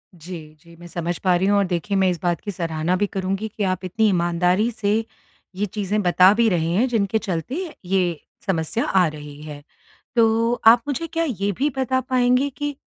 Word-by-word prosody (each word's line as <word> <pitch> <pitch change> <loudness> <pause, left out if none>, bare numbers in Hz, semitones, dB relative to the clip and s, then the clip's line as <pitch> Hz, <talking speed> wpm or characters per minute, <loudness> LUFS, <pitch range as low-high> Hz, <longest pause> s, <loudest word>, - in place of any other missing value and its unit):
जी, 160 -2 -10
जी। 170 0 -17
मैं 175 +1 -12
समझ 170 0 -3
पा 180 -1 +4
रही 185 +2 +1
हूँ 205 0 +3
और 200 - +3
देखिए 185 +3 -1
मैं 190 -1 +3
इस 175 - -2
बात 175 -3 0
की 205 - -5
सराहना 165 0 -1
भी 205 +2 +1
करुँगी 195 +2 -3
कि 210 -1 -5
आप 185 0 -1
इतनी 220 +4 +1
ईमानदारी 180 +4 +1
से 205 -2 -1 0.6
ये 205 +2 -1
चीज़ें 210 +1 -2
बता 185 +2 +5
भी 230 +1 +3
रहे 165 -3 0
हैं 225 +9 +2
जिनके 220 -3 0
चलते 215 - -3 0.2
ये 180 -4 0 0.3
समस्या 190 +4 -1
आ 185 -3 +3
रही 150 -1 -9
है। 150 -1 -9 0.5
तो 230 +1 +3
आप 235 +1 +8
मुझे 330 +4 -2
क्या 330 +1 -1
ये 200 -5 -1
भी 290 +3 +1
बता 260 0 +1
पाएँगे 255 +2 +2
कि 290 -1 -3
195 Hz, 200 wpm, -22 LUFS, 175-225 Hz, 0.6 s, आप